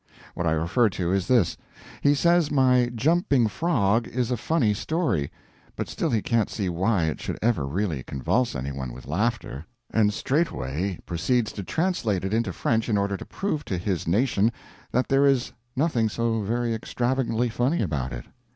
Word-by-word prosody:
What 85 - -2
I - - +3
refer 90 +9 +2
to 90 -2 -2
is 95 0 0
this: 120 -9 +3 0.4
he 145 0 +4
says 170 +1 +3
my 130 -4 +4
Jumping 140 -1 +3
Frog 115 - +1
is 125 0 -2
a - - +2
funny 120 -3 +1
story, 105 - -1 0.4
but - - -3
still 165 - -2
he 115 -6 0
can't 115 -3 +1
see 100 -4 -2
why 95 +2 +1
it 80 -1 -2
should - - -4
ever 110 - +1
really 80 -2 -1
convulse 70 - -1
any 65 +1 -3
one 65 -3 -5
with 65 - -11
laughter 100 - -2 0.3
and 105 -2 +3
straightway 95 - -1
proceeds 110 +7 0
to 100 - -6
translate 115 - 0
it 95 - -2
into 115 +1 +1
French 115 0 0
in 105 - +2
order 100 0 0
to - - -7
prove 175 -7 -3
to 95 - -2
his 90 -1 -2
nation 110 +3 +2 0.4
that 125 +2 +1
there 135 +1 +4
is 135 -3 +1 0.2
nothing 125 -7 +1
so 115 0 0
very 115 +3 -1
extravagantly 120 +1 -1
funny 125 +7 +1
about 70 -8 -2
it. - - -6
110 Hz, 180 wpm, -25 LUFS, 90-125 Hz, 0.4 s, he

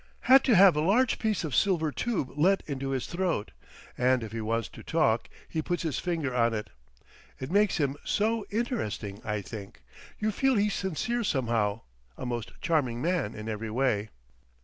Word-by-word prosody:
"Had 265 +1 +7
to 245 - +5
have 190 -3 +7
a 150 - +1
large 220 +10 +3
piece 215 -5 0
of 155 -5 -4
silver 160 - +2
tube 210 - -2
let 185 +6 +3
into 135 -2 -4
his 135 -2 -1
throat, 175 - -2 0.4
and 125 -1 +2
if 110 - -7
he 115 0 -4
wants 115 +1 -1
to - - -12
talk - - +1 0.2
he 160 - -2
puts 175 +3 -2
his 160 -4 -1
finger 165 -7 -2
on 115 -1 +2
it. 105 - -5 0.7
It 130 +4 -5
makes 205 +1 +3
him 140 -3 0
so 220 +1 +1
interesting, 200 - -3
I 105 -2 -2
think. 100 -1 -9 0.3
You 215 0 0
feel 270 +4 +2
he's 205 -1 +2
sincere 230 +6 -1
somehow. 115 - 0 0.4
A - - -5
most 120 -2 -3
charming 140 -8 +1
man 155 - -1
in 105 +1 -7
every 110 0 -4
way." 110 -3 0
150 Hz, 180 wpm, -28 LUFS, -, 0.7 s, Had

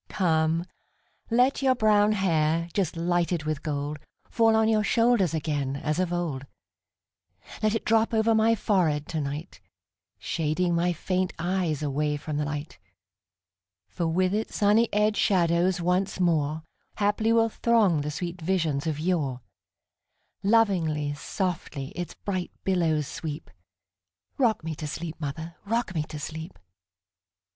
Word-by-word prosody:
Come, 165 -2 +1 0.6
let 250 +4 +3
your 260 -1 +3
brown 215 -2 +4
hair, 165 -4 +1
just 185 -5 -1
lighted 175 -1 0
with 155 -2 -2
gold, 145 0 -3 0.3
Fall 225 -2 +4
on 220 0 +3
your 215 -1 +3
shoulders 230 -6 +3
again 145 -3 -2
as 150 +3 -2
of 185 -2 0
old; 155 -6 -3 1.1
Let 215 0 +2
it 225 - -3
drop 225 0 +3
over 225 0 +3
my 220 +1 +4
forehead 165 -9 +1
to 160 -2 -2
night, 145 +5 -6 0.6
Shading 170 +2 -1
my 170 +1 +2
faint 185 +2 -1
eyes 175 -3 -1
away 150 +1 0
from 150 0 -4
the 150 - 0
light; 145 -2 -5 1.1
For 165 - -2
with 185 +3 +1
its 215 +1 -2
sunny 215 +3 +3
edged 210 0 +2
shadows 175 -1 +2
once 180 +3 0
moreHaply 175 +6 -1
will 230 0 +4
throng 215 -9 +2
the 145 - -3
sweet 170 +3 -5
visions 160 -4 0
of 155 -2 -2
yore; 155 -7 -1 1.0
Lovingly, 175 -9 +2
softly, 150 -3 -3
its 175 -1 -6
bright 185 -3 -3
billows 165 -5 +1
sweep;—Rock 170 - -5
me 160 0 -3
to 155 0 -6
sleep, 165 +2 -6
mother,—rock 170 +10 -3
me 160 - 0
to 155 - -8
sleep! 160 +4 -7
170 Hz, 135 wpm, -26 LUFS, 155-205 Hz, 1.1 s, brown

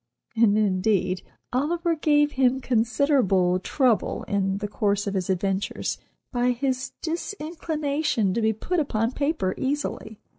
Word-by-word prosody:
And, 220 -2 +4
indeed, 185 -2 +1 0.3
"Oliver" 335 +6 +1
gave 295 -2 +3
him 260 -1 +2
considerable 225 -7 +2
trouble, 245 +3 +1
in 195 -1 0
the 205 +1 -3
course 205 -1 0
of 200 - -2
his 190 -2 -2
adventures, 195 +1 -1 0.3
by 245 -1 +1
his 260 +1 -2
disinclination 310 - -1
to 230 - 0
be 220 0 +3
put 340 - -2
upon 225 -6 0
paper 280 - -1
easily. 265 -5 -3
240 Hz, 125 wpm, -25 LUFS, 200-290 Hz, 0.3 s, And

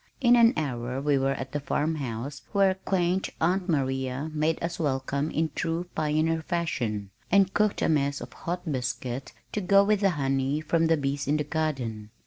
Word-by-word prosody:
In 245 -2 +6
an 235 -1 +6
hour 130 -4 -2
we 140 0 +2
were 135 +1 +1
at 130 0 -6
the 145 - -1
farm 150 +2 0
house 135 +1 -5
where 195 -2 +4
quaint 190 -1 0
Aunt 180 +3 +1
Maria 135 0 -1
made 155 +1 +1
us 170 +1 -3
welcome 140 0 -1
in 160 -1 -1
true 165 +1 -1
pioneer 155 +1 +1
fashion, 120 - -2 0.2
and 195 0 +4
cooked 210 -1 +1
a - - +3
mess 140 -2 +1
of - - -9
hot 175 +1 -4
biscuit 125 0 -3 0.2
to 210 - -2
go 200 +2 +5
with 210 0 +2
the 200 -1 +3
honey 135 +1 0
from 165 +1 +1
the 165 0 +3
bees 140 -1 -2
in 150 +2 +2
the 150 - 0
garden. 130 -10 -2
150 Hz, 185 wpm, -27 LUFS, 135-175 Hz, 0.2 s, In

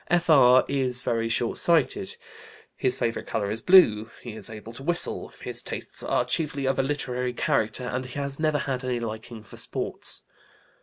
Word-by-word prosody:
F.R. 145 -8 +5
is 130 -2 +1
very 115 -2 0
short 115 0 0
sighted. 150 - +1 0.6
His 130 0 +1
favorite 120 -3 -2
color 100 -2 -2
is 110 +1 -3
blue. 115 - +6
He 120 - -6
is 110 - -4
able 110 +1 -9
to 120 - -9
whistle. 170 +5 0 0.2
His - - -1
tastes - - -6
are - - 0
chiefly 145 -4 -1
of 135 0 +1
a - - +6
literary 125 -3 -2
character, 110 0 0
and 125 +1 -3
he 125 - -9
has 140 0 -2
never 155 -1 +2
had 135 -2 -3
any 125 -1 -1
liking 110 0 -6
for 100 - -13
sports. - - -1
125 Hz, 175 wpm, -26 LUFS, 115-140 Hz, 0.6 s, blue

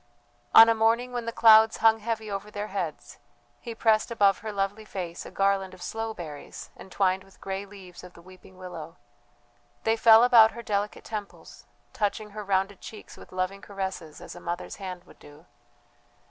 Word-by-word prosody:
On 225 - +11
a 230 - +4
morning 225 +3 +1
when 240 -1 -4
the - - -1
clouds 220 -1 +6
hung 225 0 +4
heavy 220 -1 -4
over 200 +1 -5
their 210 0 -6
heads 175 -6 -5 0.4
he 235 -2 -8
pressed 220 -1 +2
above 205 -4 +2
her 220 0 -6
lovely 200 +1 -3
face 180 -5 -7
a - - -9
garland 195 -1 0
of 185 - -18
sloe 225 +3 -4
berries 155 -8 -9
entwined 190 0 -1
with 195 0 -22
grey 195 +1 -5
leaves 190 -3 -13
of 180 -1 -12
the 170 - -16
weeping 185 0 -17
willow; 175 -3 -9 0.9
they 225 0 +2
fell 225 0 +7
about 230 -3 +6
her 235 +1 -9
delicate 205 -1 -3
temples, 210 -3 -9 0.3
touching 210 0 -2
her 210 +1 -7
rounded 195 0 -1
cheeks 215 - -11
with - - -15
loving 185 +2 -3
caresses 190 -6 -6
as - - -9
a - - -11
mother's 175 0 -6
hand 185 -3 -7
would - - -20
do. 145 +3 -16
200 Hz, 180 wpm, -26 LUFS, 185-220 Hz, 0.9 s, On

